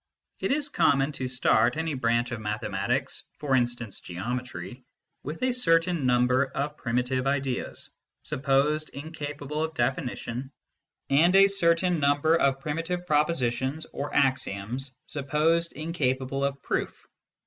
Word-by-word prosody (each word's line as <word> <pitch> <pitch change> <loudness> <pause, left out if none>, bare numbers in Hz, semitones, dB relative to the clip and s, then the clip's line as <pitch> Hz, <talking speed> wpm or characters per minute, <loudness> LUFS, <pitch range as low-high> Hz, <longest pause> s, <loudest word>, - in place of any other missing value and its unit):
It - - -1
is 290 +1 +1
common 150 - +2
to 130 -3 -3
start 125 0 +3
any 160 -1 -1
branch 115 -1 +1
of 115 -2 -4
mathematics 105 0 -2
for 140 -3 +1
instance, 120 -4 -1
Geometry 120 +3 -5 0.4
with 155 - -6
a 255 - +3
certain 165 - +2
number 125 +2 +3
of 140 +2 -3
primitive 125 +1 -1
ideas, 135 -2 -2 0.3
supposed 145 +3 +1
incapable 150 0 -5
of 160 0 -4
definition, 125 0 -2 0.6
and 170 +7 +5
a 195 0 +9
certain 180 -3 +2
number 145 +3 +3
of 135 -4 +2
primitive 165 +5 -3
propositions 150 -2 0
or 145 - -4
axioms, 130 -1 -1
supposed 155 +4 +1
incapable 135 -4 -1
of 140 0 -2
proof. - - -3
140 Hz, 125 wpm, -27 LUFS, 125-160 Hz, 0.6 s, a